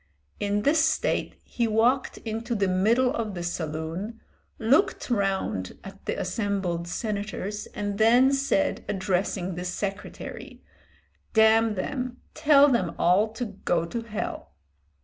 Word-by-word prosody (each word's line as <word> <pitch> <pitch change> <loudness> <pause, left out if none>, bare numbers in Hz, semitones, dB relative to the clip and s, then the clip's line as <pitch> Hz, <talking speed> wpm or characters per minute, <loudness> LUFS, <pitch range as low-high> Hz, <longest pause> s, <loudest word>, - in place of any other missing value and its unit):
In 205 0 0
this 310 +2 +4
state 320 0 0
he 235 -1 -1
walked 235 +5 +2
into 225 +2 -3
the 200 -2 +1
middle 225 +8 +3
of 220 -4 -3
the 175 - -4
saloon, 170 +6 -4 0.4
looked 265 - +2
round 195 - -1
at 195 0 -11
the - - -1
assembled 190 -6 -2
senators 210 +1 -3
and 205 0 -3
then 245 +5 +5
said, 275 +1 +1
addressing 190 -1 -1
the 175 +1 -5
secretary, 195 +2 -6 0.7
"Damn 220 0 +5
them, 250 +5 -3 0.2
tell 290 -2 +6
them 235 -11 +1
all 185 +5 +4
to 245 +2 -3
go 180 -5 -1
to 230 +8 -4
hell." 225 -1 -5
210 Hz, 130 wpm, -26 LUFS, 190-235 Hz, 0.7 s, tell